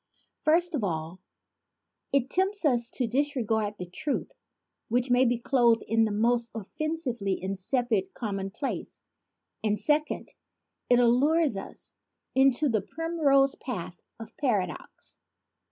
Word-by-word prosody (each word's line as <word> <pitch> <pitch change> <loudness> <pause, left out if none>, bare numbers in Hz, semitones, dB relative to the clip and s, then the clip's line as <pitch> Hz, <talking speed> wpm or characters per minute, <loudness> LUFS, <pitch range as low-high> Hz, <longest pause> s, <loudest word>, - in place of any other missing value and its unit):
First 340 +3 +3
of 275 -8 -1
all, 165 -1 -3 0.9
it 275 -1 +1
tempts 385 0 +1
us 240 -4 +2
to 255 - -1
disregard 225 -5 0
the 180 - -5
truth 185 - -3 0.6
which 245 +2 +1
may 250 +1 +5
be 240 0 +2
clothed 235 -2 +3
in 225 0 +3
the 215 - -1
most 235 +3 +1
offensively 240 - -2
insipid 195 +1 -1
com 205 -4 -3
monplace; 195 +8 -5 0.6
and 210 -1 +1
second, 300 0 0 0.6
it 245 - +6
allures 270 +4 +3
us 195 - -5 0.4
into 270 +2 +4
the 220 -5 +1
primrose 285 - +2
path 180 -8 -6 0.2
of 225 0 -10
paradox. 200 - -3
240 Hz, 120 wpm, -28 LUFS, 210-280 Hz, 0.9 s, it